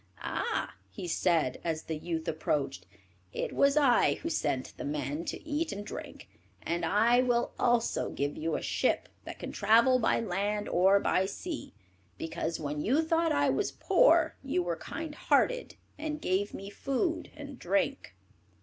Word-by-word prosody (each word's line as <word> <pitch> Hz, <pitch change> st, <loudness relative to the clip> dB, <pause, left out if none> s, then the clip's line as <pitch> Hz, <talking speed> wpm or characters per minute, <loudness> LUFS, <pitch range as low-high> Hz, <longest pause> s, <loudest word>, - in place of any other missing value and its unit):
"Ah," -, -, -2 dB, 0.2 s
he 100 Hz, -, -7 dB
said, 165 Hz, -6 st, +1 dB
as 160 Hz, -2 st, -2 dB
the 160 Hz, -, -4 dB
youth 160 Hz, +1 st, -4 dB
approached, 145 Hz, -, -2 dB, 0.5 s
"it -, -, -3 dB
was 280 Hz, +1 st, +3 dB
I 270 Hz, -5 st, +4 dB
who 330 Hz, -, -5 dB
sent 130 Hz, -, -1 dB
the -, -, -5 dB
men 145 Hz, +2 st, -3 dB
to -, -, -6 dB
eat 315 Hz, +2 st, -1 dB
and 205 Hz, +1 st, -6 dB
drink, -, -, -8 dB, 0.4 s
and 170 Hz, +1 st, -2 dB
I 225 Hz, +8 st, +4 dB
will 240 Hz, -1 st, +1 dB
also 240 Hz, -1 st, +1 dB
give 145 Hz, +1 st, -2 dB
you 165 Hz, +1 st, -2 dB
a -, -, -3 dB
ship -, -, 0 dB, 0.2 s
that -, -, -7 dB
can -, -, -6 dB
travel 230 Hz, +5 st, +4 dB
by 225 Hz, -, +2 dB
land 205 Hz, 0 st, -1 dB
or 190 Hz, +3 st, +4 dB
by 190 Hz, -1 st, +1 dB
sea, 305 Hz, -, -6 dB, 0.4 s
because 165 Hz, 0 st, -3 dB
when 150 Hz, -1 st, -3 dB
you 275 Hz, -, +2 dB
thought 330 Hz, 0 st, +2 dB
I 285 Hz, -1 st, +3 dB
was 410 Hz, -, -1 dB
poor 335 Hz, -4 st, +4 dB
you 265 Hz, -10 st, 0 dB
were 175 Hz, -1 st, -1 dB
kind 320 Hz, -, -6 dB
hearted, -, -, +1 dB, 0.2 s
and 305 Hz, 0 st, -3 dB
gave 200 Hz, -4 st, 0 dB
me 195 Hz, +1 st, -8 dB
food 275 Hz, -, -1 dB
and -, -, -9 dB
drink." -, -, -1 dB
205 Hz, 165 wpm, -30 LUFS, -, 0.5 s, I